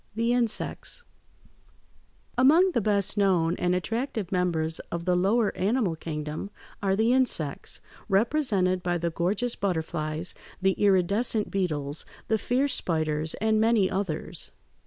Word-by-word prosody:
THE 230 +2 +1
INSECTS 245 - -1 1.3
Among 315 +9 +5
the 240 - +1
best 205 0 +1
known 180 -4 +3
and 180 0 +1
attractive 225 +1 -2
members 165 -3 0
of 170 0 -4
the 180 -1 +2
lower 205 +5 +2
animal 200 -3 +1
kingdom 155 +2 -5 0.3
are 195 -2 +2
the 225 +4 +3
insects, 220 - 0 0.3
represented 195 -4 +2
by 175 0 0
the 170 0 -2
gorgeous 200 +9 -1
butterflies, 160 -3 -2 0.3
the 190 0 +3
iridescent 200 +3 +2
beetles, 155 -6 -1 0.3
the 220 0 +2
fierce 260 +4 +1
spiders, 155 -5 -1
and 220 +1 +1
many 220 -4 +3
others. 175 -3 -3
190 Hz, 125 wpm, -27 LUFS, 170-225 Hz, 1.3 s, Among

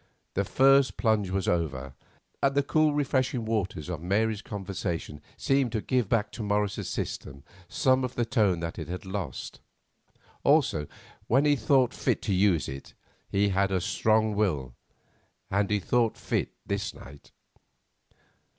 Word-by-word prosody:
The 100 - +1
first 135 +5 +4
plunge 110 -5 +1
was 95 0 -1
over, 70 -6 -1 0.5
and 140 0 +2
the 140 - +3
cool 155 +2 +3
refreshing 130 -4 0
waters 105 -7 -2
of 85 -4 -4
Mary's 105 +4 0
conversation 95 -7 -5 0.2
seemed 135 -3 +1
to 110 - +1
give 125 -4 0
back 105 -2 +1
to - - -7
Morris's 105 -1 -1
system 70 0 -5 0.3
some 130 0 +2
of 125 -1 -3
the 120 - +1
tone 105 -8 +2
that 85 0 -4
it - - -5
had 90 +3 -6
lost. 95 -8 -5 0.8
Also, 140 - +3 0.4
when 135 +5 +3
he 145 -1 +4
thought 130 0 +3
fit - - -1
to 100 - 0
use 90 -4 +3
it, 70 +1 -8 0.3
he 100 +1 +2
had 100 0 +2
a 95 - +2
strong 110 +4 +2
will, 75 - 0 0.8
and 100 +1 +1
he 105 -1 +2
thought 115 +4 +1
fit - - -2
this 100 0 -3
night. 70 0 -13
105 Hz, 150 wpm, -28 LUFS, 90-125 Hz, 0.8 s, first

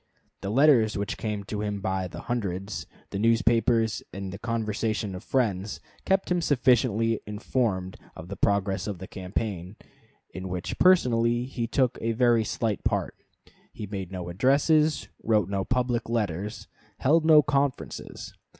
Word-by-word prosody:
The 100 - -3
letters 120 -3 +4
which 100 0 -2
came 105 -2 -3
to 105 +1 -4
him 105 -1 -2
by 95 -1 -2
hundreds, 100 -4 -4 0.2
the 100 - -3
newspapers, 115 -1 +2
and 95 -1 -6
the 100 - -7
conversation 110 -2 -2
of 90 +3 -7
friends, 105 -7 -1 0.3
kept 190 -1 +1
him 175 -1 +2
sufficiently 120 -6 +2
informed 105 -3 -1 0.2
of 80 - -9
the 100 - -6
progress 100 0 0
of 100 -3 -3
the 95 - -8
campaign, 95 0 -4 0.6
in 95 0 -6
which 90 -1 -4
personally 120 -9 +4
he 125 -3 -3
took 125 0 +1
a 115 +1 0
very 120 -1 +3
slight 110 -2 -2
part. - - -1 0.6
He 105 - -7
made 95 -2 -6
no 90 -2 -5
addresses, 145 - +2 0.2
wrote 105 -4 +2
no 100 -1 -1
public 120 -1 -1
letters, 105 -2 -2 0.3
held 160 +5 +3
no 155 -2 +7
conferences. 140 -1 -2
110 Hz, 145 wpm, -27 LUFS, 100-125 Hz, 0.6 s, no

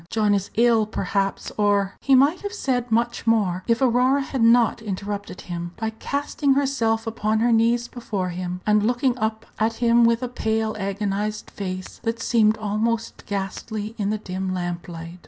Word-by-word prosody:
John 215 -2 +2
is 200 -1 -1
ill, 230 -2 +4
perhaps, 195 -2 -2
or 200 -2 +2
" - - -43
He 270 - +4
might 285 +7 +4
have 405 +1 -5
said 245 - -1
much 235 +1 0
more 195 -5 +2
if 230 +3 +2
Aurora 255 +3 +3
had 265 -2 -3
not 230 0 +4
interrupted 200 -1 -5
him 175 -1 -6
by 220 -1 -2
casting 280 +4 -1
herself 230 -5 +1
upon 220 -1 0
her 235 +2 +2
knees 235 +1 +3
before 205 -7 -4
him, 180 0 -4
and 210 0 +4
looking 245 +3 +1
up 220 +1 -2
at 220 +1 +2
him 235 +1 +3
with 230 +1 +3
a - - -1
pale, 220 -2 -1
agonized 205 +1 -2
face, 185 -2 -6
that 230 0 -2
seemed 220 -2 +3
almost 220 +2 -2
ghastly 205 +2 -4
in 200 -1 0
the 215 - 0
dim 190 -2 -4
lamplight. 175 -1 -5
220 Hz, 175 wpm, -23 LUFS, 200-235 Hz, -, ill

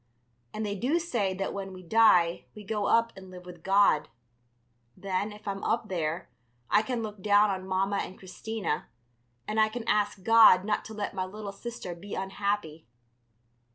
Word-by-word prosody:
And 215 0 -4
they 205 - -2
do 250 - 0
say 235 - -1
that 195 +1 -3
when 195 -1 -6
we 185 0 -11
die 180 -4 +4
we 210 - -10
go 205 0 -2
up 230 0 +3
and 190 -1 -12
live 180 -1 -11
with 175 -2 -11
God. 195 -5 +3 0.9
Then, 195 +2 -2
if 210 0 -13
I'm 195 0 -3
up 225 -1 -1
there, 165 -2 -2 0.4
I 210 - +5
can 235 0 -3
look 210 -2 -7
down 205 +1 +4
on 190 -1 -5
Mamma 195 +1 0
and 190 - -4
Christina, 195 -2 -4 0.6
and 215 +1 -1
I 215 0 +4
can 230 +1 -6
ask 205 -2 0
God 220 -4 +7
not 210 0 0
to 220 - -9
let 205 -1 -3
my 185 -1 -2
little 205 +1 -7
sister 230 -4 -7
be 190 +4 -8
unhappy. 195 - -3
200 Hz, 180 wpm, -28 LUFS, 185-215 Hz, 0.9 s, God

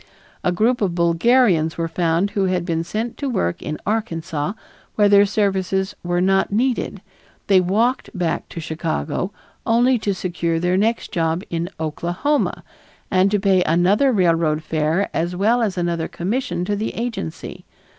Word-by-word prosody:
A 180 - +2
group 225 +7 +1
of 185 -4 0
Bulgarians 170 0 +3
were 165 0 -1
found 170 +3 0
who 195 -2 0
had 180 -2 0
been 165 -2 -1
sent 220 +7 -4
to 280 - -2
work 90 - -1
in 150 - -4
Arkansas 185 -6 -2 0.4
where 205 -1 +4
their 200 0 +6
services 195 -1 0
were 175 0 -1
not 195 +2 +2
needed; 245 +4 -1 0.4
they 190 -2 +5
walked 225 +8 +1
back 175 -2 -2
to - - -7
Chicago 160 - -3 0.3
only 240 +2 +3
to 200 -2 -1
secure 170 -2 -2
their 180 +2 +1
next 225 +4 0
job 165 +1 0
in 170 +1 -2
Oklahoma 175 - -1 0.5
and 185 +1 +4
to 205 0 +1
pay 190 -2 +3
another 185 - +3
railroad 165 -6 +2
fare 160 +5 0
as 175 +2 -1
well 220 +6 +2
as 205 -5 -1
another 170 -2 -1
commission 180 -2 -2
to 205 +2 -1
the 215 +2 -3
agency. 205 -9 -5
185 Hz, 155 wpm, -21 LUFS, 170-210 Hz, 0.5 s, their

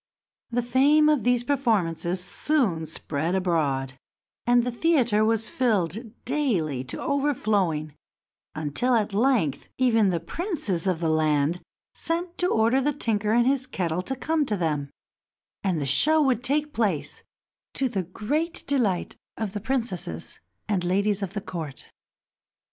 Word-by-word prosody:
The 245 0 0
fame 285 +5 +4
of 300 -4 +3
these 245 0 +2
performances 190 - 0
soon 190 - 0
spread 160 +2 -2
abroad, 150 -8 0 0.5
and 240 0 +5
the 250 - -1
theater 240 -6 +2
was 225 0 +1
filled 220 -1 -1
daily 195 - 0
to 120 - -5
overflowing 205 - 0 0.6
until, 155 - +1
at 210 -3 0
length, 215 - +1
even 225 -5 +3
the 170 -2 0
princes 200 - -2
of 175 -3 0
the 165 - +1
land 155 +1 +1 0.3
sent 340 +1 -3
to 360 - +2
order 230 0 +3
the 295 +2 +1
tinker 215 -6 0
and 240 +1 +4
his 265 0 +1
kettle 175 -1 -2
to 265 +8 -3
come 300 +5 0
to 210 - 0
them, 150 -5 -1 0.7
and 185 -5 0
the 145 - -2
show 295 - +4
would 260 -5 +2
take 295 +3 0
place, 205 -10 -1 0.5
to 270 - +1
the 215 -6 -2
great 270 - -2
delight 230 -11 0 0.2
of 215 -3 -3
the 205 - -4
princesses 205 - -3 0.3
and 200 -5 0
ladies 200 +3 +1
of 195 -2 -4
the 205 - -3
court. 160 -8 -7
215 Hz, 145 wpm, -25 LUFS, 170-260 Hz, 0.7 s, and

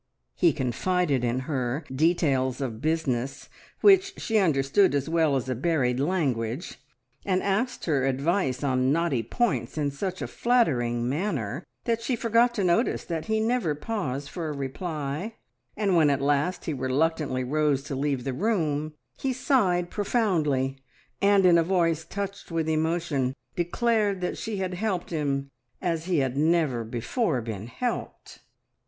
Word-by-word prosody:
He 170 - +4
confided 140 +2 0
in 120 +1 0
her 130 +1 -2
details 135 -4 +2
of 120 -5 -4
business, 140 -5 -1 0.3
which 385 -1 +5
she 225 -1 +1
understood 155 +1 +3
as 140 0 0
well 160 -3 +2
as 130 -1 -1
a 130 - 0
buried 130 -2 0
language, 135 -6 -1 0.4
and 185 -1 0
asked 215 +6 -1
her 140 -5 +1
advice 140 +1 0
on 130 -1 +2
knotty 160 -5 +1
points 130 - -1
in 145 -2 0
such 185 +6 -4
a - - -3
flattering 120 - +1
manner 140 - -2 0.2
that 230 -1 0
she 240 +2 0
forgot 235 +1 +2
to 205 - 0
notice 180 +7 +2
that 165 -2 -4
he 220 0 0
never 220 -8 +1
paused 145 - -3
for 165 -3 -4
a 150 - -4
reply, 150 - -4 0.4
and 200 -3 +2
when 155 -3 +5
at 140 -1 +2
last 145 +6 0
he 160 - -1
reluctantly 135 0 0
rose 145 0 +1
to 145 - -6
leave 135 -2 -1
the 135 - -2
room 155 - -1 0.2
he 270 - 0
sighed 205 -9 +1
profoundly, 155 - 0 0.4
and 200 -1 +5
in 170 -2 +6
a - - +3
voice 165 -3 +1
touched 200 +3 -6
with 165 -2 -1
emotion 155 -5 0 0.2
declared 205 +3 +1
that 180 - -2
she 220 -2 -4
had 190 -1 -2
helped 185 -2 -2
him 140 -3 -1 0.3
as 165 -3 -1
he 180 -2 +1
had 135 -2 0
never 150 -5 +2
before 125 - -1
been 110 -2 -5
helped! 245 - -5
160 Hz, 155 wpm, -26 LUFS, 135-190 Hz, 0.4 s, in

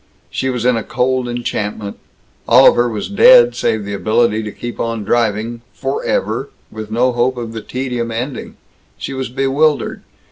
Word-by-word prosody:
She 130 - -1
was 125 -2 -2
in 125 -2 +3
a 115 - -3
cold 130 +2 0
enchantment. 105 -4 -4 0.5
All 125 +3 +7
of - - +6
her 120 0 +2
was 110 -3 -4
dead 485 - +6
save 110 -2 -1
the 100 - -5
ability 110 +2 +1
to 105 -1 -5
keep 120 +3 -7
on 115 -2 -2
driving, 115 +1 0
forever, 135 0 -2 0.2
with 110 -1 -7
no 120 +3 +2
hope 125 +1 0
of 115 -2 -5
the 110 - -5
tedium 125 -1 -3
ending. 120 +3 -5 0.4
She - - -5
was 130 -2 -4
bewildered. 140 +4 0
120 Hz, 170 wpm, -17 LUFS, 110-130 Hz, 0.5 s, All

